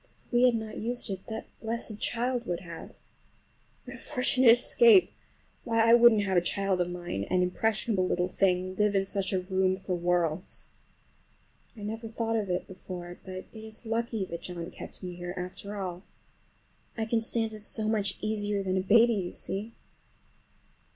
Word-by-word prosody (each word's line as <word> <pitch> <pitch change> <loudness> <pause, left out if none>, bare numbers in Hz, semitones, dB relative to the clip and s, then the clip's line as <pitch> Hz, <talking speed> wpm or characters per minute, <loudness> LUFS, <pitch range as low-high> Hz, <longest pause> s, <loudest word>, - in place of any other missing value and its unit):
If - - -32
we 240 +1 +5
had 245 -2 +4
not 220 -1 -5
used 240 +2 -1
it 190 -1 -6
that 220 - -5 0.2
blessed 225 -1 -3
child 245 0 -1
would 175 -1 -2
have! 170 -2 -10 0.9
What - - -8
a - - -11
fortunate 255 -3 +4
escape! 440 - +5 0.5
Why, 230 -1 +2
I 230 - +7
wouldn't 235 -3 +7
have 190 -2 +1
a - - +5
child 195 +1 0
of 175 - -1
mine, 175 - -4
an 180 - +1
impressionable 210 +1 0
little 180 0 0
thing, 185 0 +1
live 210 -1 +2
in 195 0 +2
such 195 -1 -2
a 190 -2 0
room 185 0 +1
for 190 -1 -4
worlds. 175 -1 0 1.1
I - - -9
never 225 +2 -5
thought 225 0 -2
of 210 -3 -1
it 180 0 -1
before, 180 -1 -8
but 185 0 -7
it 220 -1 -10
is 220 +1 -12
lucky 225 -2 -1
that 170 -2 -7
John 175 -1 -6
kept - - -10
me 180 -1 -5
here 175 +1 -6
after 185 +3 -6
all. 180 -2 -4 1.0
I 220 - -1
can 225 0 +1
stand 225 -1 -1
it 215 - -9
so 215 +1 +1
much 205 -3 0
easier 205 -2 -1
than 190 0 0
a - - +2
baby, 230 +5 +5
you 185 -4 -2
see. 210 +4 -4
200 Hz, 180 wpm, -29 LUFS, 180-225 Hz, 1.1 s, I